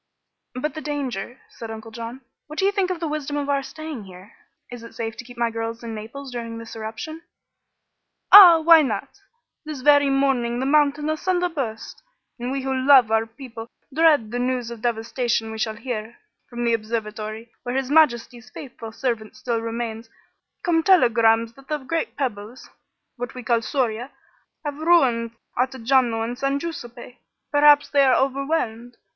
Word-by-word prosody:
"But 300 +5 -3
the 310 - -6
danger," 265 -6 -4
said 230 - -10
Uncle 225 0 -8
John. 230 +3 -7 0.3
"What 305 +1 -10
do 385 - +1
you 400 - +4
think 395 -3 0
of 365 -2 -3
the 330 - -2
wisdom 295 -1 -3
of 285 0 -3
our 280 -1 +1
staying 305 -5 -8
here? 185 +2 -14 0.4
Is 245 -1 -8
it 230 - -12
safe 225 -1 -4
to - - -7
keep 245 0 -14
my 235 -1 0
girls 225 +1 -5
in 230 -1 -5
Naples 240 +6 -8
during 230 -1 -6
this 230 0 -9
eruption?" 225 +9 -7 1.1
"Ah! 360 -5 +11
Why 325 0 +8
not? 270 - -4 0.4
This 305 -4 -7
very 285 0 +5
morning 270 -3 +1
the 260 - -1
mountain 295 +1 +2
asunder 355 +3 0
burst, 245 -9 -5 0.4
and 245 +2 -3
we 270 -1 -3
who 265 0 -1
love 260 -3 +5
our 225 0 +2
people 230 -1 -10 0.3
dread 295 -8 +3
the 245 - -2
news 250 -1 -1
of 235 -2 -9
devastation 230 0 -1
we 220 - -7
shall 220 0 -1
hear. 230 -1 -6 0.3
From 240 0 -5
the 235 -1 +2
observatory, 220 0 -4
where 245 0 -4
His 265 0 -1
Majesty's 245 -5 +2
faithful 235 -5 -9
servant 225 -2 -3
still 235 -2 -2
remains, 230 0 -5 0.5
come 330 -2 +2
telegrams 230 - +4
that 275 +2 -18
the 305 - -1
great 310 +4 -3
pebbles 240 -2 -5 0.5
what 245 +1 -6
we 250 - -7
call 235 -1 +1
scoria 240 0 -2 0.6
have 290 0 -4
ruined 255 -9 +3 0.2
Ottajano 250 -2 +1
and 240 +2 -5
San 275 0 0
Guiseppe. 250 -6 -8 0.3
Perhaps 290 0 +5
they 280 -1 +4
are 265 - +4
overwhelmed. 265 -4 -1
245 Hz, 170 wpm, -23 LUFS, 230-285 Hz, 1.1 s, Ah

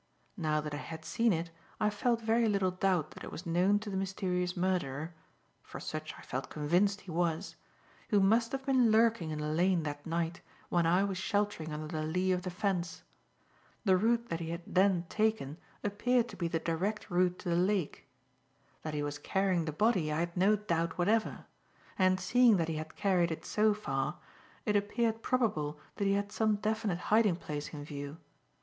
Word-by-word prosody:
Now 155 -5 0
that 150 0 -5
I - - -2
had 160 +1 -8
seen 230 0 +2
it, 165 -1 -2 0.3
I 210 0 +2
felt 230 +2 0
very 225 0 +3
little 195 -3 +2
doubt 185 -4 0
that - - -11
it - - -7
was 175 - -7
known 180 +4 +3
to 210 - -6
the - - -3
mysterious 180 -2 -1
murderer 170 -4 -1 0.5
for - - -9
such 155 0 -5
I - - -12
felt 130 0 -4
convinced 180 +7 +1
he 185 - -9
was 170 +2 -1 0.5
who 210 - +4
must 225 +4 +3
have 270 0 -4
been 260 -4 +4
lurking 220 -6 +3
in 155 - -3
the 150 0 -2
lane 175 +1 +2
that 145 -1 -5
night 165 +1 -2 0.3
when 170 -2 +2
I 180 +4 +4
was 195 -2 -2
sheltering 205 -5 -1
under 150 +1 -4
the 155 0 -3
lee 180 +4 0
of 180 -1 +1
the 185 - -4
fence. 180 -2 -2 0.8
The 190 -2 +5
route 235 +4 +1
that 165 - -2
he 165 -1 -4
had 170 +1 -4
then 185 -2 +2
taken 215 -9 0 0.3
appeared 235 +4 +1
to - - -9
be 170 - -1
the 165 - 0
direct 180 +7 -2
route 180 0 +2
to 180 - -5
the 170 - +2
lake. 180 -4 0 0.7
That 155 -1 -4
he 145 - -1
was 145 0 -4
carrying 190 0 +1
the 155 - -2
body, 185 -2 +2
I 155 +2 0
had 170 0 -3
no 195 +4 +4
doubt 170 -5 -1
whatever; 215 +5 +1 0.5
and, 185 0 +4
seeing 245 -2 +5
that 165 -2 0
he 160 - -2
had 155 0 -6
carried 180 -4 +2
it 160 - -5
so 215 0 +2
far, 135 -7 -2 0.5
it 210 - +1
appeared 225 +2 +1
probable 155 - 0 0.2
that 200 - 0
he 195 - +3
had 200 0 -1
some 215 -1 +2
definite 215 -2 -1 0.2
hiding 215 -5 +5
place 150 -3 -5
in 145 -2 -7
view. 145 0 -6
180 Hz, 195 wpm, -32 LUFS, 160-210 Hz, 0.8 s, The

